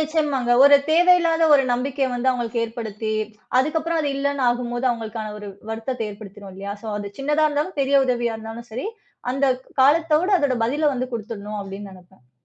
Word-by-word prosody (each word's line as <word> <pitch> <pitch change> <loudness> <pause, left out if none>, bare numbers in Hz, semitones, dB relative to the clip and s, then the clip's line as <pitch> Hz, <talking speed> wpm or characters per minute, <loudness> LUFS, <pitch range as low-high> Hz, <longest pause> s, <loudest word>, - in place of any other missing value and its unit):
நிச்சியமாங்க. 300 -5 0
ஒரு 285 0 +9 0.2
தேவையில்லாத 335 -1 +4
ஒரு 275 - +3
நம்பிக்கைய 270 +2 -1
வந்து 250 +2 +1
அவங்களுக்கு 235 -2 -2
ஏற்படுத்தி 220 -2 -4 0.5
அதுக்கப்புறம் 320 +3 -1
அது 290 - 0
இல்லன்னு 280 -1 -1
ஆகும்போது 240 +1 -2
அவங்களுக்கான 220 -2 -5
ஒரு 210 -1 -8 0.2
வருத்தத்த 225 +2 -4
ஏற்படுத்திரும் 200 -1 -11
இல்லயா? 200 +1 -6
ஸோ 225 - -6
அது 205 -1 -6
சின்னதா 295 +3 +2
இருந்தாலும் 295 +3 -2
பெரிய 275 +1 +3
உதவியா 240 -2 0
இருந்தாலும் 225 +2 -9
சரி 255 - -3 0.4
அந்தக் 260 -1 0 0.2
காலத்தோட 315 +5 +4
அந்த 285 -6 +1
பதில 290 +6 0
வந்து 255 -1 -3
குடுத்துடணும் 210 -2 -5
அப்டின்னு 195 +1 -8
நெனைப்பேன். 180 -8 -19
250 Hz, 160 wpm, -22 LUFS, 220-290 Hz, 0.5 s, ஒரு